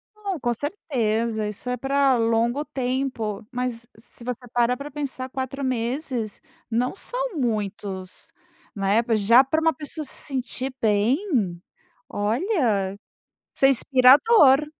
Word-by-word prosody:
Não, 400 -4 -4
com 240 -3 0
certeza 230 - -2
isso 210 +4 -7
é 250 - -1
pra 270 +1 +2
longo 230 +4 +1
tempo. 250 -6 -3
Mas 245 -2 -3
se 235 +1 -14
você 250 0 -5
para 240 +1 +2
pra 280 +3 -8
pensar 275 -3 -5
4 265 +1 -4
meses 245 -2 -2 0.3
não 240 +6 0
são - - -4
muitos, 205 - -4 0.4
né. 200 +2 +2
Já 230 +5 +6
pra 315 +4 0
uma 325 0 +3
pessoa 310 0 -5
se 270 - -4
sentir 260 -1 -3
bem, 220 - +1 0.5
olha, 215 - 0 0.6
isso - - 0
é - - +6
inspirador. 275 - +6
250 Hz, 125 wpm, -24 LUFS, 225-280 Hz, 0.6 s, Já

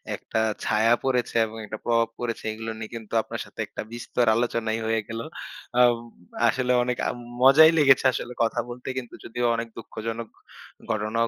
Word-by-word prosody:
একটা 110 - -3 0.2
ছায়া 115 +2 +3
পড়েছে 125 -3 0
এবং 110 +1 -9
একটা 110 +1 -6
প্রভাব 115 -1 +3
পড়েছে 120 -2 -3
এগুলো 110 +1 -5
নিয়ে 110 - -7
কিন্তু 110 -2 -9
আপনার - - -6
সাথে - - -19
একটা - - -6
বিস্তর 120 +1 -1
আলোচনাই 115 -1 0
হয়ে 110 -1 +1
গেলো। 115 +1 -5 0.5
অ্যাম 125 -1 +6 0.6
আসলে 125 +1 0
অনেক 125 0 -1
আ - - +1 0.3
মজাই 150 +5 +8
লেগেছে 135 -3 +5
আসলে 125 - -4
কথা 115 +1 0
বলতে 125 +1 -9
কিন্তু 125 -2 -5
যদিও 120 +1 -2
অনেক 115 0 -3
দুঃখজনক 115 +1 -5 0.6
ঘটনাও 110 +2 0
115 Hz, 165 wpm, -25 LUFS, 115-125 Hz, 0.6 s, মজাই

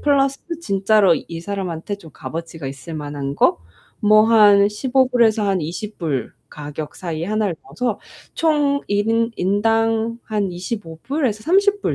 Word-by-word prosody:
플러스 275 -1 +2 0.2
진짜로 195 - +3
이 165 -1 -6
사람한테 190 0 -4
좀 165 -6 -14
값어치가 165 -2 -7
있을만한 140 0 -5
거 - - +3 0.4
뭐 215 +1 +6
한 205 -3 +6
$15 250 +3 +2
에서 220 -1 +2
한 190 -2 +1
$20 165 - -4 0.2
가격이. 150 0 -7 0.3
이 165 - -2
하나를 210 -2 -1
넣어서 210 - -3 0.4
총 295 -3 +2
1 205 +1 +1
인 230 +1 +2
인당 225 +4 +1
한 205 -4 -2
$25 175 -2 -6
불에서 265 -7 -1
$30 400 - +2
205 Hz, 220 characters per minute, -20 LUFS, 170-230 Hz, 0.4 s, 뭐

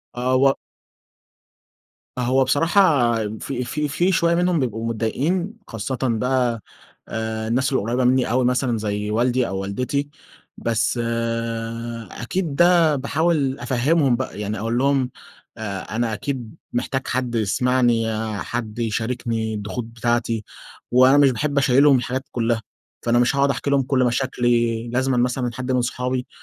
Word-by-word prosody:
آه، 125 +1 +1
و 135 +1 +5 1.7
هو 130 +2 +3
بصراحة، 145 - +3 0.2
في 125 -2 -3
في 150 +5 -2
في 175 +6 +1
شوية 170 -1 +2
منهم 175 -1 +2
بيبقوا 115 -4 -2
متضايقين، 150 - -1
خاصةً 115 +3 -4
بقى 125 -1 +1 0.5
آآ 110 0 -3
الناس 130 +4 +1
القريبة 120 +1 0
مني 125 -1 +2
أوي، 125 +1 +2
مثلًا 125 -1 +1
زي 105 -1 -2
والدي 120 +2 +1
أو 95 - -3
والدتي. 125 +9 -2 0.5
بس 115 +1 0 1.1
أكيد 155 +5 -3
ده 170 -2 +5
باحاول 140 0 0
أفهمهم 130 +3 +2
بقى 130 -4 -5
يعني، 105 0 -3
أقول 115 +3 -1
لهم 135 -1 +2 0.5
آآ 100 -3 -4
أنا 115 -1 0
أكيد 120 0 -4 0.2
محتاج 130 +2 -2
حد 125 -1 -1
يسمعني، 120 +2 +2 0.4
حد 115 -2 -4
يشاركني 115 0 -2
الضغوط 105 +3 -4
بتاعتي، 115 -1 -1 0.5
وأنا 130 +3 +6
مش 140 -2 +6
باحب 145 +4 -2
أشيّلهم 140 +1 +5
الحاجات 130 +2 -3
كلها، 115 -1 0 0.4
فأنا 120 +1 +3
مش 120 +3 +2
هاقعد 140 0 +3
أحكيلهم 140 0 +1
كل 130 0 +1
مشاكلي، 120 -2 +1
لازمًا 130 +2 0
مثلًا 125 0 0
حد 130 +2 -4
من 125 -1 +2
صحابي، 125 +1 -2
125 Hz, 135 wpm, -22 LUFS, 115-135 Hz, 1.7 s, وأنا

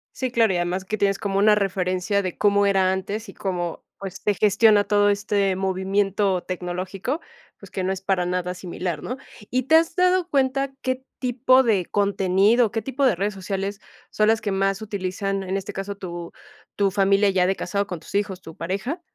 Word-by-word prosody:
Sí, 255 -2 -2
claro, 225 -5 +3
y - - -1
además 180 +2 -2
que 215 +2 -3
tienes 195 0 +1
como 195 -1 -1
una 210 +1 +6
referencia, 190 0 0
de 185 -2 -4
cómo 205 -1 +3
era 190 -2 +3
antes, 200 +3 -4
y - - -10
cómo, 175 -3 -3 0.2
pues, 195 -2 -7
se 210 - +2
gestiona 210 +1 +4
todo 205 0 +3
este 200 -1 +1
movimiento 195 0 0
tecnológico, 185 - -4 0.4
pues, - - -13
que 190 - -3
no 185 - 0
es 190 0 -4
para 190 -2 0
nada 180 0 -2
similar, 180 -3 -5
¿no? 250 - -4 0.3
¿Y 255 +1 +1
te 280 +6 +4
has 325 0 +3
dado 365 -1 +3
cuenta, 275 -2 0
qué 260 0 -2 0.2
tipo 255 +1 +3
de 205 -7 +2
contenido, 200 +3 +2
qué 225 - -2
tipo 270 +2 -1
de 240 - +4
redes 200 +4 -1
sociales, 195 +1 -4 0.3
son 215 0 +2
las 225 -1 +2
que 210 - -2
más 195 +1 0
utilizan, 195 -1 -3
en 190 +1 -2
este 195 - -6
caso, 195 +1 -4
tu 175 -3 -7 0.4
tu 200 -1 +2
familia 200 +1 +3
ya 185 -2 +2
de 190 +1 +1
casado, 200 0 -1
con 180 -4 -5
tus 160 - -11
hijos, 200 -2 -1
tu 160 - -11
pareja? 200 - -3
200 Hz, 195 wpm, -23 LUFS, 190-215 Hz, 0.4 s, una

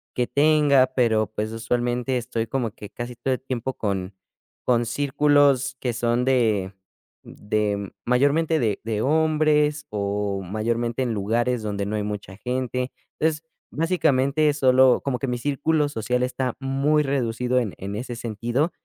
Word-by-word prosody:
que 125 - +1
tenga, 145 -1 +4
pero 110 -4 +2
pues 110 0 -3
usualmente 120 +3 -1
estoy 115 -1 -2
como 125 -4 -2
que 105 0 -11
casi 120 +1 -7
todo 130 +2 -1
el 130 - -4
tiempo 130 0 -3
con 95 -2 -3 0.5
con 120 -1 +2
círculos 140 +1 +2
que 125 -2 -2
son 120 +1 0
de 110 -7 +1 0.5
de 105 -1 -2
mayormente 145 +6 +2
de 110 -5 0
de 110 -1 -2
hombres 150 0 +2
o 100 -1 -2
mayormente 115 +5 -2
en 120 -2 -1
lugares 115 +4 0
donde 100 -1 -2
no 105 +2 -3
hay 105 - -1
mucha 105 -2 -6
gente. 125 +2 -2 0.3
Entonces, 155 0 0 0.3
básicamente 150 -3 +2
solo 130 -2 +4
como 130 -3 -1
que 135 - -2
mi 125 -1 -1
círculo 145 +3 0
social 125 0 -1
está 125 -1 -2
muy 140 +3 +1
reducido 125 -2 0
en 110 -6 -2
en 100 +2 -5
ese 120 +2 -5
sentido 120 - -1
125 Hz, 150 wpm, -24 LUFS, 110-140 Hz, 0.5 s, tenga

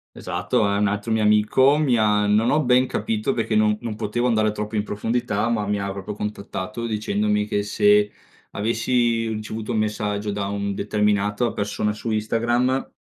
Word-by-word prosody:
Esatto, 90 +3 -1
ehm, 100 0 0
un 105 - +2
altro 105 +3 -2
mio 110 0 +2
amico, 105 +7 +4
mi 145 -5 +2
ha 105 -2 +2
non 105 +3 +3
ho 155 +1 +2
ben 125 0 +3
capito 110 -1 -1
perché 115 -1 -1
non 105 0 +3
non 115 -3 -4
potevo 115 +3 -2
andare 110 -3 +2
troppo 105 +1 -5
in 105 - +2
profondità, 115 +1 -1
ma 105 -3 -1
mi 105 0 0
ha 100 0 -3
proprio 100 +1 -6
contattato 105 +2 -5
dicendomi 105 -1 0
che 105 -1 -1
se 105 0 +3 0.4
avessi 115 +1 0
ricevuto 110 +1 -4
un - - 0
messaggio 105 -1 -1
da 100 -1 -3
un 100 0 -2
determinata 105 +2 0
persona 105 0 -1
su 110 +2 -6
Instagram 120 +4 0
105 Hz, 175 wpm, -23 LUFS, 105-115 Hz, 0.4 s, amico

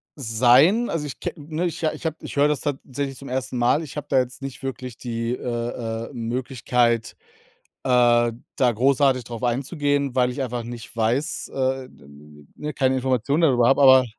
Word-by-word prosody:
sein. 135 - +4
Also, 150 -3 -2
ich 135 - -8
ke - - -4
ne, 155 +3 -4
ich 170 -1 -4
ha 155 - +2
ich - - -10
habe 160 - -1
ich - - -8
höre 145 +1 +4
das 150 -1 0
tatsächlich 140 -1 -4
zum 140 - -10
1. 125 -2 -3
Mal. 120 +6 +2
Ich 150 - -9
habe 150 - -5
da 135 - +4
jetzt 125 +1 -3
nicht 135 0 -7
wirklich 130 -2 -5
die, 115 -1 -3
äh, 115 -2 -4
äh, - - -14
Möglichkeit, 120 -1 0 0.7
äh, 120 -2 +4 0.2
da 125 -2 +3
großartig 130 +2 +2
darauf 115 0 -7
einzugehen, 140 +2 0
weil 125 -1 +3
ich 135 +2 -4
einfach 120 -2 -3
nicht 120 -1 -9
weiß, 120 +8 -1
äh, 130 -1 -2
d - - -20
n 75 +1 -16
n - - -32
ne, 150 -1 -5
keine 130 0 +2
Informationen 130 +4 0
darüber 125 -6 +4
habe, 135 +1 +4
aber 130 -1 +8
130 Hz, 195 wpm, -23 LUFS, 120-140 Hz, 0.7 s, aber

